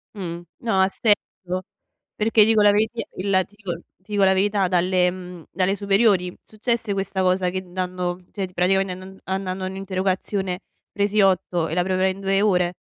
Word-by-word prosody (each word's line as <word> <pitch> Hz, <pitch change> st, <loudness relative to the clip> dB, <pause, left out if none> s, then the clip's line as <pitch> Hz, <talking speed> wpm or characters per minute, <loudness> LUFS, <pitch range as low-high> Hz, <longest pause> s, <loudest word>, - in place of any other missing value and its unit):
Mh. 175 Hz, -4 st, -5 dB, 0.2 s
No, 210 Hz, -5 st, +1 dB
ha 190 Hz, -, +4 dB
se 210 Hz, +2 st, +3 dB, 0.3 s
so. 180 Hz, +1 st, -2 dB, 0.5 s
Perché 220 Hz, 0 st, +4 dB
dico 220 Hz, -1 st, +4 dB
la 205 Hz, 0 st, +7 dB
varità, 220 Hz, +3 st, 0 dB
il 195 Hz, +2 st, -2 dB
la 190 Hz, -1 st, +4 dB
ti 205 Hz, -, -22 dB
dico 190 Hz, -6 st, -5 dB, 0.2 s
ti 210 Hz, +3 st, -11 dB
dico 200 Hz, -1 st, +3 dB
la 190 Hz, 0 st, +5 dB
verità, 195 Hz, 0 st, +2 dB
dalle, 180 Hz, 0 st, +2 dB
mhmm, 180 Hz, -2 st, -9 dB
dalle 190 Hz, +2 st, +1 dB
superiori 200 Hz, -3 st, +2 dB
successe 225 Hz, 0 st, -2 dB
questa 195 Hz, -1 st, -1 dB
cosa 185 Hz, 0 st, +2 dB
che 185 Hz, 0 st, -3 dB
dando, 180 Hz, -1 st, -3 dB
cioè 195 Hz, -2 st, -3 dB
ti 185 Hz, -, -20 dB
praticamente 190 Hz, +1 st, +2 dB
andand 185 Hz, +1 st, -11 dB
andando 190 Hz, 0 st, -3 dB
a -, -, -2 dB
un'interrogazione 190 Hz, 0 st, -2 dB, 0.3 s
presi 205 Hz, +1 st, +1 dB
8 180 Hz, -3 st, +2 dB
e 155 Hz, -, -4 dB
la 180 Hz, -, +2 dB
preparai 190 Hz, +1 st, +1 dB
in 190 Hz, -, -8 dB
2 195 Hz, 0 st, +1 dB
ore 180 Hz, -4 st, +2 dB
190 Hz, 190 wpm, -23 LUFS, 180-200 Hz, 0.5 s, la